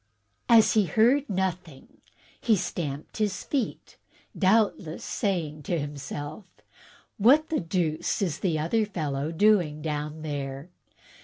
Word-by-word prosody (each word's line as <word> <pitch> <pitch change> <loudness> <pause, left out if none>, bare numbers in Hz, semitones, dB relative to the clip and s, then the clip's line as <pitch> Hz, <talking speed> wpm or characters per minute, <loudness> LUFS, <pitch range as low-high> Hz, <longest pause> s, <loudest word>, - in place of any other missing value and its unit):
As 230 -2 +6
he 215 -2 +4
heard 245 - +3
nothing 180 -6 -4 0.4
he 225 - +3
stamped 150 -6 -4
his 210 -3 -1
feet, 265 -6 -3 0.4
doubtless 195 -5 +1
saying 165 -7 -2
to 175 - +1
himself, 145 +4 -6 0.4
* - - -26
What 280 +9 +5
the 320 - 0
deuce 165 -2 -1
is 170 -7 -1
the 170 -5 0
other 170 +9 +1
fellow 155 -7 -3
doing 165 -5 +2
down 150 0 -4
there?' 140 0 -5
170 Hz, 125 wpm, -27 LUFS, 150-210 Hz, 0.4 s, As